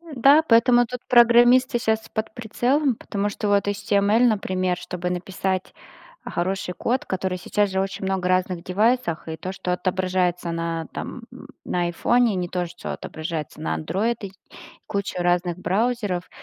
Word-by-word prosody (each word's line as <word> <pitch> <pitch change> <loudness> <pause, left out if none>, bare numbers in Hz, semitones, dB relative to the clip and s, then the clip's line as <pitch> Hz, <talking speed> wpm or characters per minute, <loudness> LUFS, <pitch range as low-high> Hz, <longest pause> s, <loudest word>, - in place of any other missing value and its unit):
Да, 275 +6 +6
поэтому 240 -1 +5
тут 250 +1 -7
программисты 240 +2 +6
щас 220 -1 -1
под 220 0 -4
прицелом. 245 +4 0
Потому 205 -1 -3
что, 205 - -4
вот 200 0 +2
HTML, 200 +1 +2
например, 185 -5 0
чтобы 180 0 -4
написать 185 +1 -3 0.5
хороший 180 +1 -2
код, 260 - -1
который 185 -1 -2
сейчас 205 +3 0
же 190 0 -1
очень 195 0 -3
много 190 -1 -1
разных 185 -1 0
девайсах. 210 -3 0
И 160 0 -5
то, 185 +4 -5
что 180 -2 -3
отображается 180 -2 -1
на, 165 -1 -3
там, - - -6 0.4
на 175 - -1
айфоне, 225 +6 +2
не 180 -1 -2
то 180 -1 -2
что 175 +1 -7
отображается 155 -2 -6
на 80 0 -1
Android 210 - -1
и, 195 -2 -6 0.6
куча 200 -3 -3
разных 175 0 +1
браузеров. 205 -2 -1
190 Hz, 150 wpm, -23 LUFS, 180-230 Hz, 0.6 s, Да